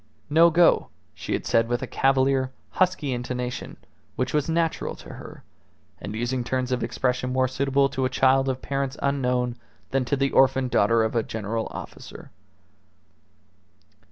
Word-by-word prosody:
"No 165 +3 +7
go," 170 +1 +4 0.3
she - - -5
had - - -2
said 115 0 +2
with 120 +1 -1
a - - -1
cavalier, 135 -1 +2 0.2
husky 180 -7 +1
intonation 125 0 -4 0.4
which 130 0 -2
was 150 +1 0
natural 165 0 -1
to - - -13
her, - - -11 0.6
and 105 - -6
using 120 +2 -1
turns 130 +1 -2
of 125 - 0
expression 125 0 -1
more 130 0 +2
suitable 135 +2 +1
to 130 -1 -1
a - - +1
child 135 +1 +3
of 130 0 -3
parents 140 0 -2
unknown 125 -3 0 0.3
than 135 -1 +1
to 140 - 0
the 135 0 0
orphaned 130 -1 +3
daughter 115 -1 +3
of 110 +1 -2
a 115 - +3
general 110 +1 -3
officer. - - -10
130 Hz, 155 wpm, -25 LUFS, 125-135 Hz, 0.6 s, No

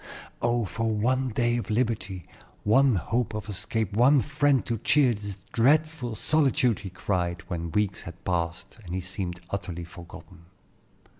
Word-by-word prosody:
"Oh, 120 -1 +1
for 115 +5 -2
one 125 +5 +1
day 120 +1 +1
of 120 - -4
liberty, 105 -6 -1 0.4
one 130 +3 +4
hope 110 +6 -1
of 105 0 -5
escape, 105 +1 -2
one 130 +6 +5
friend 145 -1 +2
to 115 -2 -2
cheer 135 -1 +4
this 100 -2 -6 0.2
dreadful 140 0 +2
solitude!" 135 -2 +2
he 100 - -7
cried, 90 -2 -2
when 85 -1 -3
weeks 100 +2 0
had 85 -3 -11
passed 85 +1 -2
and 90 -1 -5
he 95 - -1
seemed 90 -1 -4
utterly 90 -4 -4
forgotten. 85 -1 -12
110 Hz, 150 wpm, -27 LUFS, 90-125 Hz, 0.4 s, one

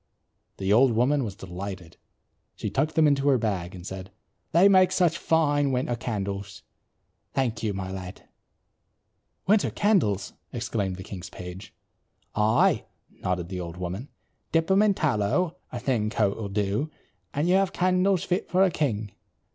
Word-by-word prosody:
The 95 +1 +1
old 125 +2 +5
woman 130 +5 +2
was 100 -5 -5
delighted. 95 -2 -7 0.6
She - - -4
tucked 155 - 0
them 160 - +5
into 140 -1 +3
her 135 - +5
bag 95 -6 -2
and 90 -1 -10
said, 95 0 -7 0.4
"They 175 +4 +6
make 185 -2 +5
such 175 -3 +3
fine 145 -4 +2
winter 125 -1 0
candles. 100 -4 -4 0.7
Thank 125 -4 0
you, 110 - 0
my 95 -1 -4
lad." 95 0 -8 1.2
"Winter 205 +1 +3
candles!" 110 - +1 0.2
exclaimed 110 -6 -2
the 95 - -8
king's 95 -2 -8
page. 90 +2 -9 0.6
"Aye," 105 +1 +3 0.3
nodded 90 -2 -3
the 95 -1 -4
old 85 -1 -6
woman. 90 +9 -5 0.4
"Dip 165 0 +3
them 195 +3 +4
in 210 -2 +4
tallow, 155 - +1
a - - -4
thin 115 -6 0
coat 105 -3 +1
will 105 -3 -5
do 105 +8 -1 0.4
and 145 +4 0
you 180 - +4
have 195 0 +3
candles 185 0 +2
fit 180 - -1
for 185 +1 +4
a 190 - +3
king. 110 -10 -1
115 Hz, 155 wpm, -26 LUFS, 95-160 Hz, 1.2 s, They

